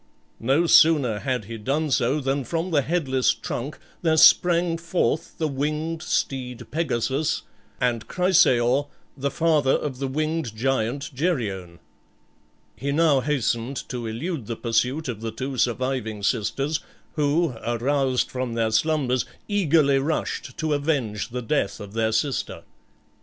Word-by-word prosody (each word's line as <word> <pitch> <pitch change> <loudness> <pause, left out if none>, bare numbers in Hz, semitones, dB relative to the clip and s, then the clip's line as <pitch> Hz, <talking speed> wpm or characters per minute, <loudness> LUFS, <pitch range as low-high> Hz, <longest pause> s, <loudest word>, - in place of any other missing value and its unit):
No 135 +9 +2
sooner 145 -10 +5
had 125 -4 -2
he 115 +2 -7
done 145 +7 -1
so 135 +2 +2
than 135 0 -1
from 165 +7 -3
the 145 -3 +3
headless 135 -5 +1
trunk 135 +5 -5 0.2
there 160 -2 +2
sprang 170 0 +5
forth 170 -2 -1
the 160 - 0
winged 155 +3 -2
steed 125 -5 -2
Pegasus, 150 0 -1 0.4
and 120 -3 0
Chrysaor, 145 -7 +3 0.3
the 140 0 -1
father 155 -4 +2
of 130 -4 -2
the 135 - -1
winged 155 -3 -2
giant 135 +3 -1
Geryon. 110 - -2 1.0
He 140 +2 -3
now 150 -2 +4
hastened 130 -2 -1
to 120 -3 -4
elude 125 - -4
the 115 - -3
pursuit 125 +7 0
of 115 -4 -5
the 115 - -3
two 130 +4 -5
surviving 120 -4 -1
sisters, 135 +8 0 0.3
who, 150 0 +1
aroused 130 +2 0
from 125 -2 -3
their 115 -1 +1
slumbers, 130 0 +1 0.2
eagerly 160 -9 +3
rushed 155 +4 -3
to 155 -2 0
avenge 140 -9 -1
the 125 +1 -4
death 115 -5 -1
of 100 -1 -9
their 110 0 +1
sister. 130 +5 -1
135 Hz, 135 wpm, -24 LUFS, 120-155 Hz, 1.0 s, sooner